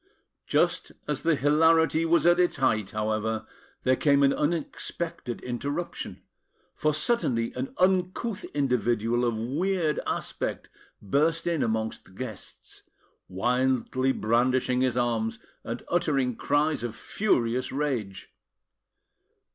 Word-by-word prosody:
Just - - +1
as 150 -2 -2
the 165 -1 +3
hilarity 160 +2 +3
was 165 -1 +3
at 175 +1 +5
its 180 -1 +3
height, 110 -7 +1
however, 110 +1 -2 0.4
there 130 0 +4
came 140 0 +3
an 140 - +5
unexpected 155 -4 -3
interruption; 145 +7 -4 0.5
for 155 - +1
suddenly 150 - +1
an 130 +1 -5
uncouth 185 +3 +1
individual 120 -4 0
of 120 -2 0
weird 155 - 0
aspect - - -3 0.3
burst 155 - +1
in 170 -4 0
amongst 110 0 -2
the - - -18
guests, 110 0 -8 0.5
wildly 125 +5 +1
brandishing 125 +2 +1
his 130 -1 +1
arms, 115 -2 0 0.3
and - - -5
uttering 130 -4 +1
cries 150 +4 +1
of 115 -2 -4
furious 125 - 0
rage. 130 -9 -3
130 Hz, 115 wpm, -27 LUFS, 115-160 Hz, 0.5 s, at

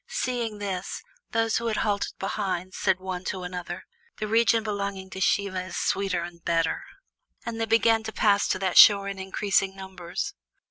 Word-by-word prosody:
Seeing 235 -4 -2
this, 195 -2 -4 0.3
those 225 0 +1
who 235 - -2
had 220 - 0
halted 205 -2 0
behind 185 -2 -3
said 190 -2 +1
one 185 -1 -5
to 185 -1 -3
another: 180 0 -6 0.3
"The 215 - -3
region 230 +1 +3
belonging 200 -3 -4
to 190 - -6
Siva 190 -1 +1
is 185 -1 -7
sweeter 190 -3 0
and 170 -1 -9
better." 165 - 0 0.6
And 230 -1 -4
they - - +2
began 225 0 +4
to 220 - -3
pass 205 -2 +3
to - - +1
that 185 -1 +3
shore 200 -1 +8
in 195 -1 -5
increasing 195 0 0
numbers. 190 -3 -5
195 Hz, 175 wpm, -26 LUFS, 185-215 Hz, 0.6 s, shore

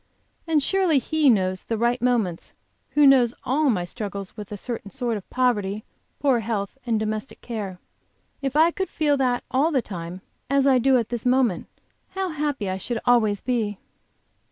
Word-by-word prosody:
And 310 -3 +2
surely 370 -3 +2
He 295 +3 +2
knows 185 -5 +2
the 225 - -2
right 240 +2 +1
moments 230 -9 0 0.4
who 295 0 +6
knows 250 -4 +5
all 285 +3 +2
my 195 -7 +1
struggles 200 +1 -5
with 210 -1 -9
a 205 - -4
certain 230 -1 -4
sort 245 -1 -2
of 205 - -8
poverty, 215 -5 0 0.4
poor 270 -4 +3
health 210 -2 -3
and 225 -2 +1
domestic 215 +3 -4
care. 205 -6 -5 0.6
If 270 -1 -2
I 320 +3 +5
could 380 +2 -3
feel 295 -2 +1
that 250 -2 +1
all 280 +5 +3
the 270 -7 +1
time, 180 -1 -7 0.3
as 275 0 +3
I 265 -2 +5
do 260 +1 +4
at 230 -3 -1
this 240 -2 -2
moment, 250 -7 +2 0.5
how 380 -1 -1
happy 295 - -2
I 185 0 -2
should 235 +5 -3
always 215 -5 +3
be! 225 -5 -1
240 Hz, 180 wpm, -24 LUFS, 205-275 Hz, 0.6 s, who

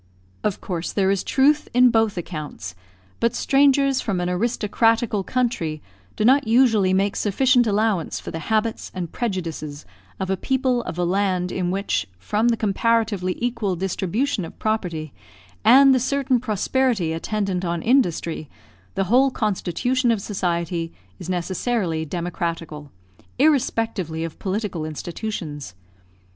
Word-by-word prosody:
Of 205 - -1
course 175 -2 -3
there 195 -1 +2
is 195 -2 0
truth 290 +3 +2
in 250 0 +6
both 225 -3 +2
accounts; 155 - -6 0.5
but 235 +1 +1
strangers 275 0 +3
from 195 -5 -1
an 175 0 -1
aristocratical 225 +1 +1
country 230 -11 -1 0.4
do 215 - 0
not 265 0 +4
usually 225 -5 +4
make 195 +2 +1
sufficient 245 +4 +3
allowance 210 -5 0
for - - -7
the 165 - -4
habits 220 +1 0
and 175 -3 -4
prejudices 165 -9 -4 0.3
of 190 0 -2
a - - +2
people 260 +1 0
of 165 - -5
a 175 - +1
land, 185 -1 0
in 180 -2 -1
which, 195 +2 -1
from 210 - 0
the 235 -1 +2
comparatively 215 -3 0
equal 230 -6 -1
distribution 195 +6 -1
of 165 - -9
property, 175 -9 -2 0.5
and 270 +4 +7
the 255 - +3
certain 265 0 +1
prosperity 225 -4 0
attendant 195 +1 -2
on 170 -2 -2
industry, 170 - +1 0.5
the 195 - +1
whole 250 +8 +4
constitution 240 - 0
of 230 -3 +2
society 170 -4 -2 0.3
is - - -7
necessarily 180 -1 -1
democratical, 165 -2 -4 0.5
irrespectively 225 - +1
of 165 -2 -6
political 195 -4 -3
institutions. 155 - -5
200 Hz, 135 wpm, -22 LUFS, 175-240 Hz, 0.5 s, and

